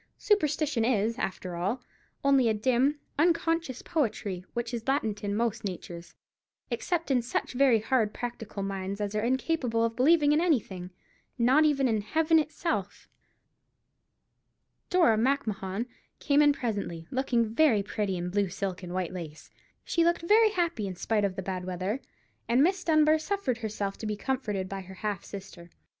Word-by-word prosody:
Superstition 300 - +1
is, 230 0 +1
after 185 -1 -3
all, 200 +9 -2 0.4
only 275 -4 +4
a 220 - +1
dim, 260 +6 +2 0.2
unconscious 330 -4 +1
poetry, 210 - -2
which 240 0 -3
is 230 0 -4
latent 220 -7 0
in 200 0 -1
most 225 0 -1
natures, 175 -3 -7 0.6
except 335 -5 -1
in 255 -2 +3
such 235 - -3
very 255 -2 +5
hard 225 -2 +1
practical 225 -4 -5
minds 195 0 -4
as 205 0 -2
are 210 - 0
incapable 250 -1 +1
of 230 0 -2
believing 295 +3 +4
in 300 +2 +3
anything—not 245 - 0
even 275 -3 +3
in 220 -3 +1
Heaven 320 +8 +3
itself. 295 - -3 1.8
Dora 330 - +4
Macmahon 220 -5 -1 0.3
came 285 0 +3
in 295 -1 +6
presently, 205 - -3
looking 240 -4 0
very 235 -7 +4
pretty 200 -2 -2
in 175 +1 -3
blue 200 0 +1
silk 190 +1 -4
and 180 -1 -6
white 185 -2 -2
lace. 160 -4 -8 0.3
She 335 - +2
looked 340 0 +2
very 435 +5 +5
happy, 340 - -1
in 185 - -5
spite 210 +3 0
of 190 -2 -2
the 190 - -4
bad 185 -1 -3
weather, 185 +7 -3 0.5
and 245 +4 +5
Miss 370 +2 +1
Dunbar 310 -1 +4
suffered 310 - -2
herself 205 -3 -3
to 220 - -4
be 210 - -1
comforted 210 -5 -2
by 195 0 -5
her 190 +1 -11
half 205 -1 -3
sister. 185 -3 -10
230 Hz, 160 wpm, -28 LUFS, 195-290 Hz, 1.8 s, in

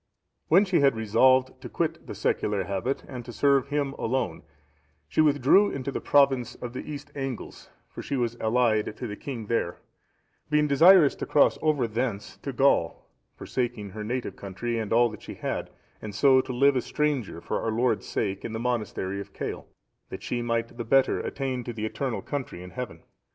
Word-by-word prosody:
When 190 +5 +5
she 185 -3 +2
had 140 -3 +4
resolved 130 +4 +3
to - - -8
quit - - -2
the - - -6
secular 105 -2 0
habit, 100 +8 -2
and 125 -3 -7
to 120 - -9
serve 140 +1 +2
Him 140 -1 -1
alone, 115 -9 -1 0.7
she - - +2
withdrew 150 +7 +5
into 140 0 -4
the - - -4
province 135 -4 +3
of 125 -1 -7
the 130 - -4
East 145 - -8
Angles, 135 -4 -6 0.2
for - - -9
she 140 - -3
was 120 -2 -1
allied 110 -2 +1
to - - -5
the 105 -3 -5
king 120 -2 -6
there;(685) 105 -6 -1 0.7
being 150 0 +3
desirous 160 +2 +7
to - - -6
cross 145 - +4
over 150 -6 +2
thence 110 -2 -3
into 140 - -5
Gaul, 130 -10 +2 0.3
forsaking 120 -5 -3
her 105 +2 -6
native 120 +3 -3
country 115 +4 -4
and 110 -2 -4
all 120 +1 +5
that 110 - -10
she - - -8
had, - - -3 0.3
and 105 -2 -7
so 130 +3 +5
to 130 - -7
live 140 +3 +4
a 125 - +2
stranger 140 - -1
for - - -3
our - - -1
Lord's 110 -2 0
sake 100 -2 -2
in 110 - -5
the 110 - -3
monastery 105 -5 -2
of - - -11
Cale,(686) - - -5 0.4
that - - -8
she 120 - -2
might 115 0 -2
the - - -1
better 135 +3 +3
attain 130 -3 -3
to 120 - -4
the 110 -1 -4
eternal 125 +2 -3
country 130 -11 -5
in 90 - -10
heaven. 125 +2 -7
125 Hz, 195 wpm, -27 LUFS, 110-140 Hz, 0.7 s, desirous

